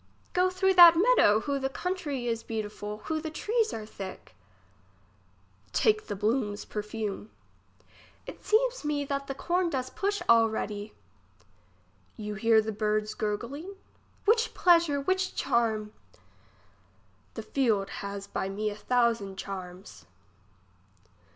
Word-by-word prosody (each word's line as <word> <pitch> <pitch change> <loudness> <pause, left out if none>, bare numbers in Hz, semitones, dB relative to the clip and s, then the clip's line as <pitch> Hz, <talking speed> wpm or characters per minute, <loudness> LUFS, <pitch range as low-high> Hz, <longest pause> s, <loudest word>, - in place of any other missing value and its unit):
Go 365 +1 +3
through 380 +1 +2
that 345 -2 +10
meadow. 350 - +5
Who 280 +1 -2
the 270 0 -1
country 295 -5 -3
is 230 -1 -1
beautiful! 210 -1 -5
who 315 -1 -2
the 315 - -4
trees 440 +7 0
are 215 - -5
thick! 195 - -9 1.4
Take 215 0 +2
the 205 - -3
bloom's 210 0 -1
perfume. 210 -1 -5 1.0
It - - -10
seems - - +1
me 295 -1 -1
that 275 0 -3
the 275 - -4
com 355 +4 0
does 260 -4 -3
push 405 +1 -1
alredy. 220 -2 +2 1.2
You 210 -2 -5
hear 220 +1 +3
the 220 - -3
bird's 215 0 -1
gurgling? 255 - -4 0.5
Which 450 +2 +2
pleasure! 335 -5 +4
which 375 +6 -1
charm! 220 -3 0 1.4
The 225 - -5
field 220 -5 0
has 200 0 -5
by 195 -1 -3
me 210 +2 -2
a - - -7
thousand 230 -4 0
charms. 185 - -8
230 Hz, 125 wpm, -28 LUFS, 210-330 Hz, 1.4 s, that